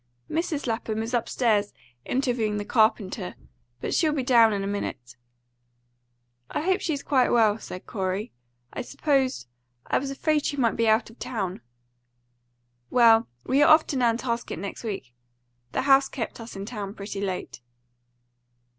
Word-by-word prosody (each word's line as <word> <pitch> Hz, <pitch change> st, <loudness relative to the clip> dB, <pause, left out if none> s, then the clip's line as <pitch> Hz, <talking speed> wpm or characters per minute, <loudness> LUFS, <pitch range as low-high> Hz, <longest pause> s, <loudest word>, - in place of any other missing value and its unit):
"Mrs. 320 Hz, -2 st, -1 dB
Lapham 225 Hz, -2 st, -2 dB
is 230 Hz, +2 st, -5 dB
upstairs 225 Hz, -3 st, +1 dB, 0.3 s
interviewing 245 Hz, -5 st, 0 dB
the 205 Hz, -, -3 dB
carpenter, 210 Hz, -4 st, +1 dB, 0.5 s
but -, -, -2 dB
she'll 315 Hz, -2 st, +3 dB
be 280 Hz, -3 st, -1 dB
down 235 Hz, -3 st, +6 dB
in 200 Hz, -1 st, -1 dB
a -, -, -2 dB
minute." 195 Hz, -12 st, -4 dB, 1.3 s
"I -, -, -2 dB
hope 375 Hz, +4 st, +1 dB
she's 310 Hz, -6 st, -2 dB
quite 260 Hz, -3 st, +3 dB
well," 220 Hz, -2 st, +3 dB
said 185 Hz, -, -8 dB
Corey. 195 Hz, +1 st, -3 dB, 0.4 s
"I -, -, -3 dB
supposed 270 Hz, -, 0 dB, 0.4 s
I -, -, +1 dB
was 275 Hz, -, -4 dB
afraid 300 Hz, +2 st, 0 dB
she 290 Hz, -, -2 dB
might 235 Hz, -4 st, +2 dB
be 230 Hz, 0 st, +1 dB
out 220 Hz, +1 st, +2 dB
of 230 Hz, -, -20 dB
town." 200 Hz, -7 st, -3 dB, 1.3 s
"Well, 230 Hz, -2 st, +5 dB, 0.2 s
we 275 Hz, +2 st, +2 dB
are 300 Hz, -, +7 dB
off 310 Hz, 0 st, +7 dB
to -, -, -4 dB
Nantasket 235 Hz, -1 st, 0 dB
next 195 Hz, +6 st, -6 dB
week. 190 Hz, -, -5 dB, 0.6 s
The -, -, -1 dB
house 270 Hz, 0 st, +5 dB
kept 230 Hz, -2 st, -5 dB
us 230 Hz, -1 st, -9 dB
in 195 Hz, 0 st, -5 dB
town 205 Hz, -3 st, -6 dB
pretty 200 Hz, 0 st, -6 dB
late." 180 Hz, -10 st, -4 dB
230 Hz, 155 wpm, -26 LUFS, 205-265 Hz, 1.3 s, are